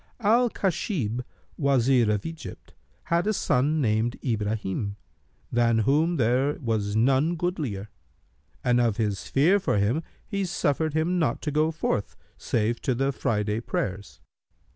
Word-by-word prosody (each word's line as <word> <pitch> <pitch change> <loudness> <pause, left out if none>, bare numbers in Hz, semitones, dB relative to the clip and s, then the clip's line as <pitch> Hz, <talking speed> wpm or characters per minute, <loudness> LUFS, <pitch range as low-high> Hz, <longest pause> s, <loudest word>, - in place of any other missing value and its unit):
[FN#298] 230 - -10
Al 235 +3 +4
Khasнb,[FN#299] 160 - -1 0.4
Wazir 130 -4 +3
of 105 -1 -1
Egypt, 165 -1 -8 0.3
had 170 +3 0
a 215 - +2
son 150 -3 +1
named 115 0 0
Ibrahнm, 105 -3 -2 0.6
than 120 -1 +3
whom 150 +10 +2
there 130 +2 +2
was 110 -4 -1
none 135 +8 +3
goodlier, 150 - -3 0.7
and 125 -1 +3
of 115 -3 +1
his 105 -4 -2
fear 170 +9 +4
for 190 - 0
him, 110 +10 +1 0.3
he 200 -2 -2
suffered 155 -3 0
him 170 +3 +1
not 145 -8 +1
to 150 - -1
go 155 +2 +2
forth, 155 -10 -2 0.2
save 115 +1 -1
to 130 - 0
the 135 +3 +1
Friday 105 -4 -1
prayers. 100 -3 -4
130 Hz, 140 wpm, -26 LUFS, 110-160 Hz, 0.7 s, Al